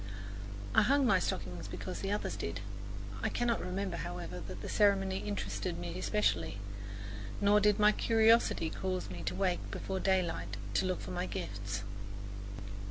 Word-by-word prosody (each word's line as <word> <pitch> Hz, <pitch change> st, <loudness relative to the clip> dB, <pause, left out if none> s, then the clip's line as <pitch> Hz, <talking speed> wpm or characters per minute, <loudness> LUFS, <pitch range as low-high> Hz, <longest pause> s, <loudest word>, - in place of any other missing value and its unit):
I -, -, +7 dB
hung 280 Hz, +1 st, +4 dB
my 195 Hz, -6 st, +5 dB
stocking 90 Hz, -, -2 dB
because 185 Hz, -, -4 dB
the 195 Hz, -, -1 dB
others 205 Hz, -, -1 dB
did; -, -, -3 dB, 0.6 s
I -, -, +1 dB
cannot 240 Hz, -1 st, +1 dB
remember, 180 Hz, 0 st, -2 dB
however, 90 Hz, -, -4 dB
that 95 Hz, +2 st, -7 dB
the -, -, -3 dB
ceremony 195 Hz, -2 st, +3 dB
interested 100 Hz, -3 st, -2 dB
me 85 Hz, +1 st, -4 dB
especially, 95 Hz, -3 st, +1 dB, 0.8 s
nor 205 Hz, +1 st, +6 dB
did 210 Hz, -1 st, +4 dB
my 210 Hz, 0 st, +7 dB
curiosity 225 Hz, -7 st, +4 dB
cause 185 Hz, -, -2 dB
me 90 Hz, -1 st, -5 dB
to -, -, -2 dB
wake 185 Hz, -3 st, 0 dB
before 190 Hz, -1 st, -2 dB
daylight 170 Hz, -, +1 dB, 0.2 s
to 185 Hz, -, +3 dB
look 185 Hz, -, -1 dB
for -, -, -6 dB
my 180 Hz, 0 st, -1 dB
gifts. 100 Hz, -, -3 dB
180 Hz, 155 wpm, -34 LUFS, -, 0.8 s, I